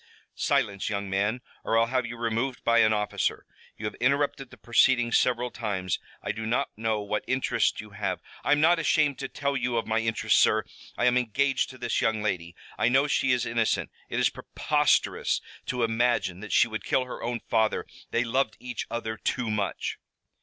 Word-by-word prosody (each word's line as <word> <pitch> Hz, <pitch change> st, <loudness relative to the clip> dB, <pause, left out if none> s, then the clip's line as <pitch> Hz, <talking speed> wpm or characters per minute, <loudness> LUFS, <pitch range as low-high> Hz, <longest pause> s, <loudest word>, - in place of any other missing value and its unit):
"Silence, 100 Hz, 0 st, 0 dB
young 100 Hz, -2 st, -3 dB
man, 105 Hz, +5 st, 0 dB, 0.2 s
or 115 Hz, -, +1 dB
I'll 115 Hz, -, +5 dB
have 125 Hz, +1 st, -1 dB
you 120 Hz, -, -7 dB
removed 115 Hz, +2 st, -2 dB
by 115 Hz, 0 st, +4 dB
an 110 Hz, -1 st, +5 dB
officer. 105 Hz, -1 st, -1 dB, 0.3 s
You 110 Hz, -, -6 dB
have 105 Hz, -, -2 dB
interrupted 140 Hz, 0 st, +1 dB
the 130 Hz, -, -14 dB
proceedings 120 Hz, +3 st, +3 dB
several 125 Hz, 0 st, +2 dB
times. 95 Hz, -5 st, -2 dB, 0.2 s
I -, -, -1 dB
do 110 Hz, +1 st, -5 dB
not 115 Hz, -, -1 dB
know 110 Hz, -1 st, -1 dB
what 105 Hz, +1 st, -2 dB
interest 130 Hz, -3 st, +1 dB
you 105 Hz, -1 st, -8 dB
have 100 Hz, -2 st, -2 dB
" -, -, -20 dB
"I -, -, 0 dB
am 145 Hz, -, +2 dB
not 165 Hz, +3 st, +5 dB
ashamed 150 Hz, -3 st, +2 dB
to 135 Hz, -, -3 dB
tell 140 Hz, +1 st, -2 dB
you 125 Hz, -2 st, 0 dB
of 115 Hz, -, 0 dB
my 110 Hz, 0 st, +1 dB
interest, 115 Hz, 0 st, +1 dB
sir. -, -, +4 dB, 0.3 s
I -, -, +1 dB
am 125 Hz, 0 st, +4 dB
engaged 135 Hz, +4 st, 0 dB
to 130 Hz, -, -11 dB
this 120 Hz, -1 st, -1 dB
young 110 Hz, -2 st, +1 dB
lady. 85 Hz, -5 st, -2 dB, 0.2 s
I -, -, +4 dB
know 135 Hz, +3 st, +4 dB
she 135 Hz, -2 st, +1 dB
is 125 Hz, -1 st, +2 dB
innocent. 115 Hz, -1 st, 0 dB, 0.2 s
It -, -, -1 dB
is -, -, +4 dB
preposterous -, -, +1 dB, 0.3 s
to 125 Hz, -2 st, -1 dB
imagine 115 Hz, -6 st, +1 dB
that 105 Hz, 0 st, -8 dB
she -, -, +5 dB
would 110 Hz, -1 st, -5 dB
kill 130 Hz, -, +1 dB
her 125 Hz, -, -8 dB
own 120 Hz, 0 st, -2 dB
father. 110 Hz, -1 st, +1 dB, 0.2 s
They 120 Hz, -, +1 dB
loved 120 Hz, -1 st, 0 dB
each 125 Hz, -1 st, -5 dB
other 110 Hz, -1 st, -3 dB
too 120 Hz, 0 st, -1 dB
much." 100 Hz, -3 st, -2 dB
115 Hz, 200 wpm, -27 LUFS, 110-125 Hz, 0.3 s, I'll